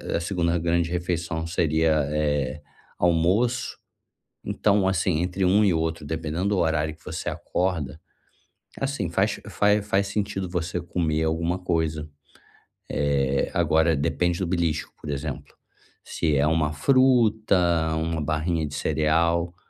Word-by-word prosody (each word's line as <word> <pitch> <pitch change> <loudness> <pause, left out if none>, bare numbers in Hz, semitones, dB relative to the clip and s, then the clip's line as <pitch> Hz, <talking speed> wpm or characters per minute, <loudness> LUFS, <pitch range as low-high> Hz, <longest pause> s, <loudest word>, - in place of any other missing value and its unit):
a - - +1
2ª 85 -1 0
grande 85 0 0
refeição 85 -2 -2
seria, 80 -1 +2 0.2
eh, 75 -2 -1 0.4
almoço. 95 +9 +1 0.7
Então, 100 -2 +2
assim, 90 -3 +1
entre 90 +1 -1
um 100 +4 +4
e 95 -4 +3
outro, 80 -1 -2
dependendo 80 +5 -2
do 100 - +1
horário 80 -2 0
que - - -25
você - - -5
acorda, 80 -6 -2 0.8
assim 135 - -2
faz 95 +5 0
faz 105 0 +2
faz 100 0 +1
sentido 100 -2 -2
você 90 0 -2
comer 80 -2 -1
alguma 85 +3 0
coisa, 80 -4 -1 0.8
eh, 70 -2 +1
agora 80 +1 +3
depende 85 +4 0
do 95 - 0
belisco, 85 -3 -1
por 75 - -6
exemplo, 70 0 -5 0.5
se 80 -3 -1
é 70 +2 +3
uma 80 -1 +1
fruta, 115 - +3 0.4
uma 80 0 -1
barrinha 80 +1 -1
de 70 - -8
cereal, 85 +3 +1
85 Hz, 130 wpm, -25 LUFS, 80-95 Hz, 0.8 s, um